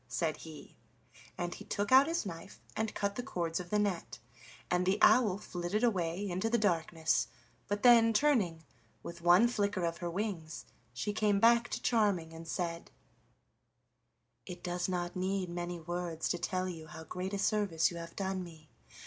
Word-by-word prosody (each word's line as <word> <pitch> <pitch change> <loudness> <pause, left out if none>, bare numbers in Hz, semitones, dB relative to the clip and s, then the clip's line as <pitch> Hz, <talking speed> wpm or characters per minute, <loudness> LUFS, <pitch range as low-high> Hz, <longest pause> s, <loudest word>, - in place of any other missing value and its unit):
said 160 -3 -1
he, 160 -2 -11 0.6
and 175 0 -3
he - - -10
took 205 +3 -2
out 265 +2 +8
his 330 -6 -1
knife 170 +1 -8 0.2
and 220 -1 -2
cut 200 -1 -1
the 245 - -4
cords 170 -10 -2
of 175 -1 -7
the 210 - +1
net, 200 -5 -1 0.5
and 180 0 +2
the 190 +2 +3
owl 215 -7 +5
flitted 180 +2 -3
away 185 -3 0
into 185 +4 -1
the 235 - +3
darkness, 160 - +1 0.4
but 205 0 -2
then 235 -2 +7
turning, 210 - +2 0.4
with 170 0 -8
one 175 +7 +6
flicker 205 -6 0
of 170 0 -2
her 175 - -3
wings, 170 -4 -4 0.3
she 130 +12 -3
came 210 -1 +2
back 235 +2 +5
to - - -3
Charming 200 -8 +1
and 165 0 -9
said: 170 -1 -3 1.6
"It 180 -1 -8
does 175 +1 -2
not 175 -1 -2
need 185 0 -1
many 175 0 -4
words 170 -1 -3
to 175 - -1
tell 185 +1 -1
you 165 -3 -7
how 160 +1 -9
great 185 +4 -4
a - - -1
service 195 -6 +1
you 170 - -7
have 170 0 -8
done 190 -1 -2
me. 160 -3 -13
180 Hz, 175 wpm, -32 LUFS, 170-205 Hz, 1.6 s, out